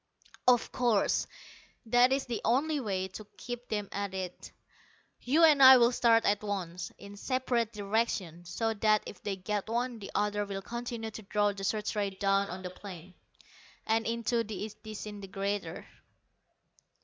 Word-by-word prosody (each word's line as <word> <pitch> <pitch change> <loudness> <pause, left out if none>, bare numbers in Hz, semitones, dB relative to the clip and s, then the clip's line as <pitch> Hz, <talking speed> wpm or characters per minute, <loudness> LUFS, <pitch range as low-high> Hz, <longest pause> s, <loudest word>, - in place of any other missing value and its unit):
"Of 245 -2 +4
course, 240 -5 +2 0.6
that 245 +3 +5
is 270 0 +1
the 235 -3 -3
only 290 +6 +2
way 190 -6 -2
to 205 +2 -10
keep 245 0 -7
them 210 -2 -2
at 200 -1 -3
it. 185 -2 -6 0.7
You 300 +7 +3
and 300 -3 +7
I 260 0 +11
will 240 0 +5
start 230 -2 +4
at 205 0 +2
once, 185 -4 -4
in 200 0 -11
separate 245 0 -1
directions, 200 -5 -2
so 225 +5 -1
that 215 0 +2
if - - -10
they 200 -2 -2
get 205 +2 -3
one, 240 0 -1
the 200 - -8
other 205 0 +1
will 195 -1 -5
continue 235 -1 -5
to 220 - -8
draw 205 0 +1
the 195 -1 -8
search 210 +2 -1
rays 200 -2 -2
down 195 0 +2
on 185 +1 -6
the 180 - -5
plain, 185 -2 -10 0.7
and 225 0 +1
into 230 0 0
the 215 0 -5
disintegrator." 200 -4 -5
210 Hz, 160 wpm, -30 LUFS, 195-235 Hz, 0.7 s, I